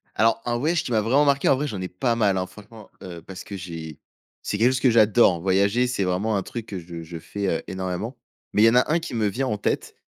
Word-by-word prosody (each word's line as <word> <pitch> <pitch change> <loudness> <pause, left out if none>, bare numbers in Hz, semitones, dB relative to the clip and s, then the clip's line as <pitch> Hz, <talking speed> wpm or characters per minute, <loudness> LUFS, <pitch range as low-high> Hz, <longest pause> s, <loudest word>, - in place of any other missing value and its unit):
Alors, 115 +1 +2
un 120 0 0
voyage 155 +6 0
qui - - -5
m'a 110 -2 +3
vraiment 130 +7 +3
marqué, 140 -1 +3
en - - +5
vrai, 145 +3 -2
j'en 100 -8 -5
ai 90 - -3
pas 115 +7 -1
mal 105 -4 +2
hein, 90 - -1
franchement, 105 +2 -14
heu, 85 -2 -8
parce 95 0 -9
que 100 - -7
j'ai 80 -4 -8 0.4
c'est 105 - -2
quelque 120 +4 +4
chose 130 - -1
que 130 - +4
j'adore. 110 -5 +4
Voyager, 100 +6 +2
c'est 125 -5 -1
vraiment 95 +4 0
un 95 - -2
truc 115 +2 -6
que 100 - -5
je 85 -1 -8
je 85 +1 -8
fais, 100 +4 -4
heu, 85 - -1
énormément. 95 +6 -4 0.4
Mais 105 - +2
il - - +7
y - - +8
en 115 - +1
a 125 +4 +3
1 165 - +3
qui 165 -7 -6
me 110 -2 +1
vient 130 +7 -1
en 105 - -1
tête. - - -2
105 Hz, 275 wpm, -24 LUFS, 95-120 Hz, 0.4 s, y